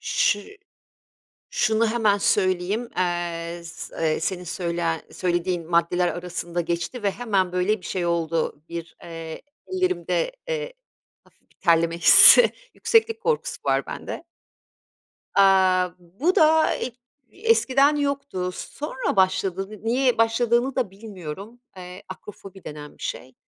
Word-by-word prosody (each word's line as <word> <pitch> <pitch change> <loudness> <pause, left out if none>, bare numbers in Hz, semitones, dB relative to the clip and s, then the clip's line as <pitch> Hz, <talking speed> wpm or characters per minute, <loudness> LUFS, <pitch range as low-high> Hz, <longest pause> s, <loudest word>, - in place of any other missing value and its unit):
Şı 205 - 0 0.9
şunu 230 - +1
hemen 220 -3 +2
söyleyeyim. 195 +3 0
Eee, 175 -1 -2
s 165 - -9 0.2
eee - - -2
senin 180 +2 -3
söyle 170 - -2
söylediğin 175 -1 -2
maddeler 175 +1 +2
arasında 175 0 -4
geçti 170 +8 -4
ve 200 - +2
hemen, 195 -6 -1
böyle, 180 +4 +1
bir 175 - -13
şey 180 -2 -2
oldu 165 -3 -1
bir, 170 0 -7
eee, 165 -1 -8 0.3
ellerimde, 375 +7 -1 0.2
eee, - - -3 0.5
hafif - - -30
bir - - -31
terleme 170 -1 +2
hissi 475 - +8 0.2
yükseklik 455 0 +2
korkusu 465 0 -1
var - - +1
bende. - - -7 1.1
Aaa, 185 -2 +4
bu 200 - -1
da 315 -1 +4
ig 245 - -5 0.4
eskiden 295 - +3
yoktu. 280 -10 -2
Sonra 275 +4 -4
başladı 190 0 +1
ni 215 0 -12
niye 250 +1 +1
başladığını 235 +3 +2
da 250 -7 0
bilmiyorum. 200 +2 -9 0.2
Eee, 180 0 -10
akrofobi 195 0 -11
denen 150 -1 -9
bir - - -14
şey. 130 0 -6
190 Hz, 125 wpm, -24 LUFS, 175-245 Hz, 1.1 s, hissi